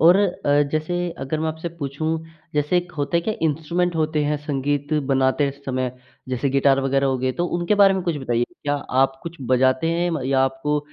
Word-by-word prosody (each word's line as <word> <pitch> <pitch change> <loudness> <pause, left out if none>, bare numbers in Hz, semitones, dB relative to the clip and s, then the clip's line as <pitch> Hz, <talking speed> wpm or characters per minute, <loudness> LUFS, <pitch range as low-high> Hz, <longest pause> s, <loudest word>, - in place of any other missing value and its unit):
और 175 +3 +7
अ, 145 -7 +2
जैसे 155 +3 -1 0.3
अगर 155 +3 -2
मैं 160 - 0
आपसे 160 +2 -4
पूछूँ 155 -1 -4 0.5
जैसे 150 +4 +1
एक 175 0 -1
होता 145 +4 +1
क्या 215 +5 -2
इंस्ट्रूमेंट 170 +3 -1
होते 155 -1 +1
हैं 150 +1 +1
संगीत 145 +1 -1 0.2
बनाते 135 +2 +2
समय, 130 -1 -1 0.4
जैसे 130 +2 0
गिटार 135 0 +3
वग़ैरह 135 0 +1
हो 130 -1 +1
गए 130 +1 0
तो - - +1
उनके 175 +4 +1
बारे 195 -1 +6
में 190 - -1
कुछ 170 -3 -1
बताइए 120 -4 0 0.2
क्या 145 0 0 0.3
आप 135 0 -4
कुछ 170 0 -7 0.2
बजाते 130 +5 +3
हैं 175 +1 0
म 160 -3 -2
या 135 0 +2
आपको 135 +3 -1
150 Hz, 200 wpm, -22 LUFS, 135-170 Hz, 0.5 s, और